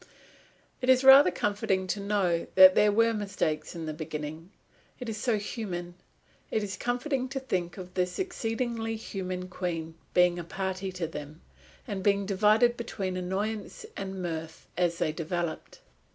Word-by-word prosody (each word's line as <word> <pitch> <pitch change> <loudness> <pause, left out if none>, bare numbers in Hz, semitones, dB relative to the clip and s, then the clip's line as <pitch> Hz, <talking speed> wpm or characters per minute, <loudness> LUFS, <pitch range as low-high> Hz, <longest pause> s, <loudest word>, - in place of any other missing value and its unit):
It 255 - -1
is 260 0 +6
rather 270 +2 +9
comforting 200 -2 0
to 185 +3 -2
know 200 -4 0
that 185 0 +10
there 210 +2 +4
were 230 +2 +3
mistakes 195 -8 -2
in 165 -1 -5
the 155 - -3
beginning. 155 +1 -6 0.5
It 250 -3 -5
is 215 - -4
so 225 0 +1
human. 185 -5 -5 0.6
It 215 - 0
is 195 -2 -4
comforting 255 +4 -1
to 270 +1 -3
think 180 -9 -3
of 180 -1 -9
this 180 -1 -1
exceedingly 230 -9 -2
human 185 -4 -5
Queen 170 -3 -4 0.2
being 180 -1 +4
a - - -4
party 190 +2 -3
to 180 -2 -3
them, 155 0 -8 0.5
and 200 -4 -3
being 200 0 +2
divided 215 +4 +3
between 195 -5 -4
annoyance 200 +4 -3
and 190 -1 -5
mirth 160 -2 -5
as 175 -1 +1
they 170 -3 0
developed. 170 +1 -4
190 Hz, 155 wpm, -28 LUFS, 175-220 Hz, 0.6 s, that